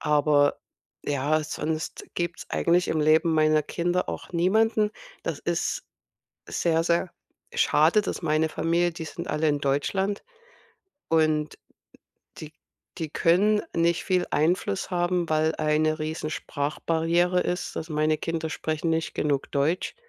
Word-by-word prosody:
Aber, 145 -1 +3 0.5
ja, 145 +2 +1
sonst 155 +1 -4
gibt's 175 0 -3
eigentlich 175 +2 +2
im 160 - +1
Leben 160 +2 +4
meiner 155 -1 +3
Kinder 175 +4 -1
auch - - -8
niemanden. 210 +5 +2 0.3
Das - - -3
ist - - -2 0.7
sehr, 165 -1 +1
sehr 170 +1 +1 0.4
schade, 165 +8 +4
dass 200 - -4
meine 155 0 +1
Familie, 170 +2 +1
die 165 -1 -7
sind 145 - -7
alle 150 +1 0
in 145 -1 +1
Deutschland 190 +9 -1 0.9
und 155 -2 +1 0.8
die 155 0 -9 0.5
die 160 -2 -3
können 205 +7 +3
nicht 170 0 +2
viel 185 -1 +1
Einfluss 185 +5 0
haben, 175 -1 0
weil 155 +1 +2
eine 155 0 +1
riesen 155 0 -3
Sprachbarriere 165 +5 0
ist, 180 +1 -3
dass 160 - -5
meine 155 0 +1
Kinder 165 -1 -3
sprechen 155 +1 -2
nicht 160 0 -1
genug 145 -2 -1
Deutsch 155 - 0
160 Hz, 130 wpm, -26 LUFS, 155-175 Hz, 0.9 s, Leben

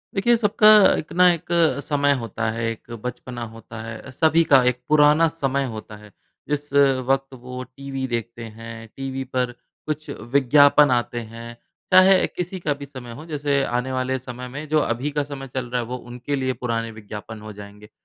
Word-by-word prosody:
देखिए 235 +5 +3
सबका 210 -1 +3 0.3
एक 155 - -6
ना 180 +1 +6
एक 170 0 -6 0.4
समय 145 -1 +2
होता 115 -2 -3
है, 115 +1 -4
एक 115 +1 -11
बचपना 125 0 -6
होता 115 0 -10
है, 110 +3 -8
सभी 160 +4 +3
का 140 -4 +5
एक 125 0 -4
पुराना 150 +2 +5
समय 140 -4 -1
होता 110 0 -8
है 105 0 -15 0.4
जिस 145 -1 -3
वक़्त 135 -1 +2
वो 125 0 -7
टीवी 135 +1 -6
देखते 115 0 -4
हैं। 115 +1 -9
टीवी 135 0 -4
पर 125 -1 -2 0.4
कुछ 155 0 -4 0.2
विज्ञापन 145 +1 +6
आते 120 0 0
हैं, 115 +1 -9 0.4
चाहे 185 +1 +7
किसी 180 +1 -5
का 155 -4 0
भी 140 0 -9
समय 130 -4 -10
हो - - -11
जैसे 145 -3 0
आने 125 +1 -2
वाले 130 0 -1
समय 125 0 -8
में 145 +5 -7
जो 155 0 +3
अभी 130 +1 -1
का 145 0 0
समय 140 -1 -7
चल 130 0 -4
रहा 125 0 -1
है 115 - -6
वो 125 +1 -4
उनके 125 +4 -3
लिए 130 -1 -1
पुराने 115 -2 -2
विज्ञापन 110 0 -9
हो 105 0 -9
जाएँगे। 105 +1 -12
130 Hz, 185 wpm, -23 LUFS, 120-145 Hz, 0.4 s, चाहे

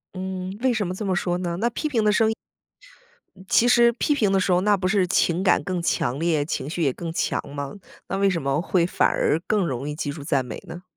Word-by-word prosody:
嗯， 185 +1 -5
为 260 -1 +2
什 215 -4 -1
么 180 - -3
这 205 +3 -5
么 190 -2 0
说 175 0 -1
呢？ 175 -1 -3
那 235 +3 +1
批 275 +6 -3
评 240 -7 0
的 210 - +4
声 220 +1 +3
音 220 - -1 1.0
嗯， 185 0 -15
其 240 - +4
实 240 -1 +5
批 275 +5 0
评 210 -8 +2
的 195 - +3
时 185 - 0
候 180 0 +3
那 205 +1 +3
不 185 -1 -1
是 190 0 +2
情 175 0 +1
感 190 - +3
更 185 -2 -2
强 130 -6 0
烈， 160 -3 +1
情 140 -2 -3
绪 170 +2 -3
也 135 -4 +2
更 165 +3 -6
强 165 - -1
吗？ 140 -1 -5 0.3
那 195 - -2
为 200 0 +3
什 175 -3 -1
么 135 +2 0
会 180 -1 +1
反 - - +2
而 155 - +1
更 210 -4 +1
容 135 +1 -3
易 - - -3
记 145 -1 -3
住 145 0 -8
赞 140 -3 0
美 - - -7
呢？ 175 +1 -9
185 Hz, 280 characters per minute, -24 LUFS, 160-205 Hz, 1.0 s, 实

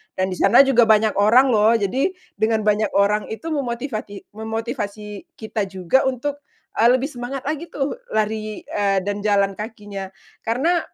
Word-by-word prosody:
dan 185 0 -1
di 185 - -5
sana 200 +7 +6
juga 240 -4 +4
banyak 215 0 +4
orang 245 +6 +5
loh! 220 +1 +4
Jadi, 260 - 0 0.2
dengan 220 0 +1
banyak 210 -1 +1
orang 205 +1 +2
itu, 320 +9 -6
memotivati 235 -6 -4
memotivasi 220 - -5
kita 220 -2 -3
juga 190 +8 +1
untuk, 280 +3 -3 0.4
eee, 230 - +6
lebih 260 +4 +2
semangat 250 +2 -6
lagi 310 +3 -3
tuh, 290 - -3 0.2
lari, 215 0 -2
eee, 200 -2 0
dan 205 +1 -3
jalan 200 -1 +1
kakinya. 205 -3 -6 0.3
Karena, 300 +10 +1
220 Hz, 155 wpm, -21 LUFS, 205-260 Hz, 0.4 s, sana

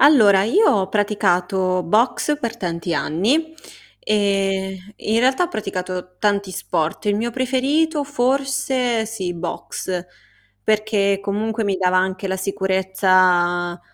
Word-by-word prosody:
Allora, 210 -10 +6
io 410 - +3
ho 195 -3 +1
praticato 185 -3 +1
Boxe 240 - +1
per 235 -4 -4
tanti 170 -3 -3
anni, 260 - 0 0.5
ehm, 195 -2 0 0.2
in 220 +2 -1
realtà 260 +6 +3
ho - - -4
praticato 185 - -5
tanti 200 -2 0
sport, 165 +2 -2
il 205 0 +2
mio 235 +3 -2
preferito 280 +5 0
forse 265 -3 0
sì, 190 -5 -4
Boxe, 180 +1 -5 0.6
perché 210 - +1
comunque 215 +2 -2
mi 200 - 0
dava 185 0 +1
anche 190 +1 0
la 190 - -1
sicurezza, 185 -2 +1
200 Hz, 120 wpm, -20 LUFS, 185-235 Hz, 0.6 s, Allora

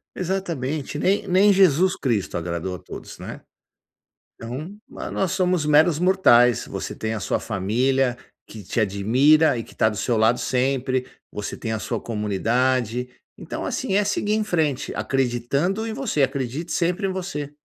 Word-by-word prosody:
Exatamente. 160 -7 -3
Nem 195 +5 +1
nem 195 +3 +5
Jesus 185 -1 +4
Cristo 110 -10 -1
agradou 85 +2 -3
a - - -9
todos, - - -10
né? - - -8 1.0
Então, 140 - -7
mas - - -7
nós 190 -1 0
somos 180 -4 +1
meros 150 +1 +4
mortais. 125 - +4
Você - - -5
tem 110 0 -3
a 105 - -4
sua - - -1
família, 120 +5 0 0.3
que 110 -2 -10
te 110 - -2
admira 125 +10 +3
e 115 - -3
que - - -16
tá 110 - +3
do 105 - -5
seu 120 +2 0
lado 110 +3 +3
sempre. 130 0 0 0.3
Você 105 - -5
tem 110 -1 -4
a 110 - -1
sua 115 0 -3
comunidade. 120 +3 0 0.3
Então, - - -6
assim, 190 - -2
é 205 0 +3
seguir 205 +1 0
em 215 -1 0
frente, 155 -8 -1
acreditando 135 - -1
em 220 - -3
você. 225 - -1
Acredite 135 +4 -2
sempre 180 +3 0
em 190 - -2
você. 150 -6 -5
135 Hz, 165 wpm, -23 LUFS, 115-180 Hz, 1.0 s, nem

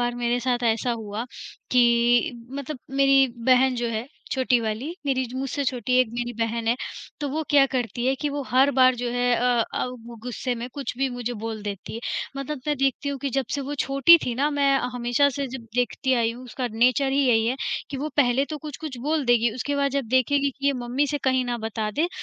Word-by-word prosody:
बार 240 0 0
मेरे 240 0 0
साथ 245 0 0
ऐसा 230 +3 -2
हुआ 215 +2 -4 0.5
कि 240 -1 +4 0.2
मतलब 280 +1 -5 0.2
मेरी 275 0 +6 0.2
बहन 260 0 +5
जो 240 0 -1
है, 225 +2 -3 0.2
छोटी 255 -2 +2
वाली, 230 +9 -3
मेरी 260 -1 +1
जू 250 +2 -6
मुझसे 275 +2 -2
छोटी 255 -1 -2
मेरी - - +7
एक 255 - +2
मेरी 240 0 -3
बहन 230 0 -1
है, 235 - +4 0.5
तो 290 - -2
वो 310 +3 -2
क्या 285 -2 +6
करती 245 0 -1
है 265 - +3
कि 295 - 0
वो 285 0 -3
हर 265 +3 +5
बार 255 0 +6
जो 245 0 -2
है 245 0 +2
अ 240 -1 +2
अ, - - 0 0.4
गुस्से 250 +1 -3
में 240 +1 -5
कुछ 270 -4 -4
भी 270 0 +1
मुझे 245 -1 -4
बोल 225 -1 -4
देती 205 0 -6
है, 230 - -5 0.4
मतलब 275 +1 -4
मैं 295 -1 +1
देखती 275 +1 0
हूँ 280 -1 -3
कि 275 +1 -3
जब 270 +2 0
से 285 - -1
वो 280 +2 -4
छोटी 275 +5 +6
थी 245 - -2
ना, 280 +5 +1
मैं 280 -1 +3 0.2
हमेशा 245 +3 +2
से 280 0 -3
जब 245 -2 -8
देखती 250 +2 0
आई 230 -2 +1
हूँ, 245 +2 -11
उसका 250 +1 -4
नेचर 250 +4 +3
ही 275 - +1
यही 225 -2 +3
है, 250 +3 0 0.3
कि 280 - -4
वो 290 +3 -3
पहले 265 -1 +3
तो 305 - -4
कुछ-कुछ 300 -1 -7
बोल 300 0 0
देगी, 240 -1 +4
उसके 285 +4 -2
बाद 280 0 +1
जब 275 0 -1
देखेगी 275 +3 +2
कि 275 +1 -5
ये 280 - +4
मम्मी 255 +4 0
से 290 0 -2
कहीं 260 -1 +2
ना 245 -1 -2
बता 220 -1 -3
दे, 310 +10 0
255 Hz, 230 wpm, -24 LUFS, 240-275 Hz, 0.5 s, मेरी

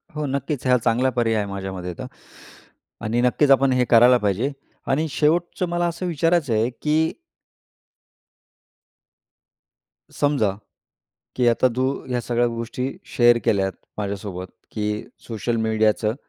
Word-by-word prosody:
हो, 150 -1 -2
नक्कीच, 140 0 -3
हां. 125 0 +5
चांगला 120 +2 +1
पर्याय 115 -2 +2
आहे 105 - 0
माझ्यामते 95 -2 -5
तर. - - -5 1.0
आणि 115 +3 0
नक्कीच 130 +3 +3
आपण 135 0 +5
हे 125 -1 +2
करायला 120 +2 +7
पाहिजे. 105 +5 0 0.4
आणि 155 +4 +1
शेवटचं 170 +5 +1
मला 175 0 0
असं 170 +2 -4
विचारायचं 165 -4 +1
आहे, 110 +2 +2
की 155 +1 +1 3.0
समजा, 145 -8 +1 0.8
की 125 -1 +2
आता 120 +2 +3
तू 130 - 0 0.2
ह्या 125 -1 -1
सगळ्या 120 0 +1
गोष्टी 120 +2 -3 0.3
शेअर 120 -1 +6
केल्यात 95 -1 +2 0.3
माझ्यासोबत, 100 -3 -4 0.2
की 105 0 -2 0.2
सोशल 115 +1 -2
मीडियाचं 110 0 +1
120 Hz, 125 wpm, -22 LUFS, 110-140 Hz, 3.0 s, करायला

